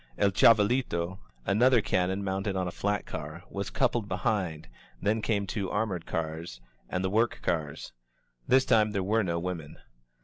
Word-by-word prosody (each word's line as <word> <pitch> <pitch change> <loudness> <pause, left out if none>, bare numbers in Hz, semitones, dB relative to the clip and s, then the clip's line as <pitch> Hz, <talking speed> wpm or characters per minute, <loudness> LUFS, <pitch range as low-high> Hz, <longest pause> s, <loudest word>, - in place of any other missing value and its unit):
"El 100 - +3
Chavalito," 105 -4 +3 0.3
an 100 +3 +1
other 125 -1 +6
cannon 95 -1 0
mounted 95 +1 -2
on 95 -1 -1
a - - -3
flat 100 +3 -1
K;ar, 75 +3 -7
was 100 0 -3
coupled 115 -4 +1
behind, 95 - -1 0.3
then 110 - +1
came 105 -2 0
two 95 -1 -3
armored 100 -6 -2
cars, 80 -5 -4 0.3
and 90 - -1
the - - +1
work 115 +3 +2
cars. 75 -6 -2 0.5
This 130 +1 +5
time 110 -1 +3
there 100 -2 0
were 110 +3 +2
no 85 -3 -1
women. 85 -3 -5
95 Hz, 165 wpm, -29 LUFS, 85-110 Hz, 0.5 s, other